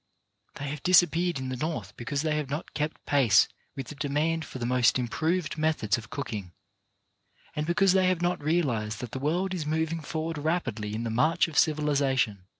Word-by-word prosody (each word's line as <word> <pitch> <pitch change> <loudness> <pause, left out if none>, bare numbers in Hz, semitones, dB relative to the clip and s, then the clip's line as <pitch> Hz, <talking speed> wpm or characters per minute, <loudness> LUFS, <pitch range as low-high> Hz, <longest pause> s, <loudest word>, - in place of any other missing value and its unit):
They 145 0 -5
have 145 -1 -5
disappeared 175 -1 +4
in 130 -1 -4
the 130 - -3
North 120 - -4
be 120 - -8
cause 140 +3 -1
they 155 -1 0
have 150 -3 -2
not 150 +4 -5
kept 150 +1 -3
pace 130 -9 +5 0.3
with 135 -3 -6
the - - -6
demand 150 +3 -1
for - - -8
the 120 - -3
most 125 -1 +3
improved 155 +7 -1
methods 155 -10 +1
of 110 -2 -8
cooking, 105 -10 -5 1.0
and 150 +1 -2
because 185 +2 +3
they 190 -1 +4
have 185 -2 +1
not 175 -1 0
realized 130 -10 0
that 120 -3 -6
the 130 - -4
world 175 +7 0
is 160 -5 -3
moving 160 +1 0
forward 160 0 -4
rapidly 120 -10 -2
in 115 - -3
the 115 - -2
march 155 +10 +3
of 165 - -9
civiliza 145 -3 +2
tion. 100 -7 0
150 Hz, 200 wpm, -28 LUFS, 125-165 Hz, 1.0 s, pace